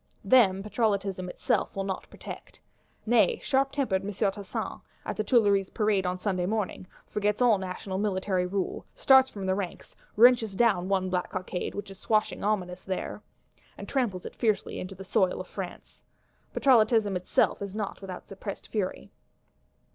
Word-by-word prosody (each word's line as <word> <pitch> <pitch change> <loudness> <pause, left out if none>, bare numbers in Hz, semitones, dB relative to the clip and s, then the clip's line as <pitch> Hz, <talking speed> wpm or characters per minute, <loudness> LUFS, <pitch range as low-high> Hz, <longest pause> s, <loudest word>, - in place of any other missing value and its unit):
Them 195 -7 +5
Patrollotism 200 -4 -1
itself - - -1
will 195 - -1
not 195 -1 -4
protect. - - -10 0.5
Nay, 220 -4 +4
sharp 270 0 +2
tempered 230 -10 0
"M. 205 - -3
Tassin," 200 -1 -3 0.2
at - - -3
the 215 - -1
Tuileries 205 -4 +3
parade 210 -4 +1
on 180 0 -1
Sunday 185 -2 -1
morning, 205 -3 -2 0.2
forgets 210 0 0
all 235 -5 +4
National 190 +1 -4
military 190 -2 0
rule; 195 0 -2
starts 265 -1 +6
from 200 -2 -6
the 190 - +2
ranks, 190 -2 -5 0.2
wrenches 230 -3 +5
down 195 -5 +2
one 190 -1 +1
black 180 -1 -1
cockade 185 -1 -4
which 200 -1 -6
is 195 - -12
swashing 215 -1 0
ominous 185 -3 -1
there; 190 -1 -4 0.6
and - - -8
tramples 230 -10 -1
it - - -7
fiercely 220 -4 0
into 185 +1 -6
the 195 - -9
soil 185 0 +1
of - - -6
France. - - -8 0.5
Patrollotism 220 -5 +4
itself 180 +2 +1
is 200 0 -5
not 210 -2 -4
without 185 -2 -8
suppressed 195 +1 -7
fury. 200 -4 -3
200 Hz, 160 wpm, -28 LUFS, 185-215 Hz, 0.6 s, starts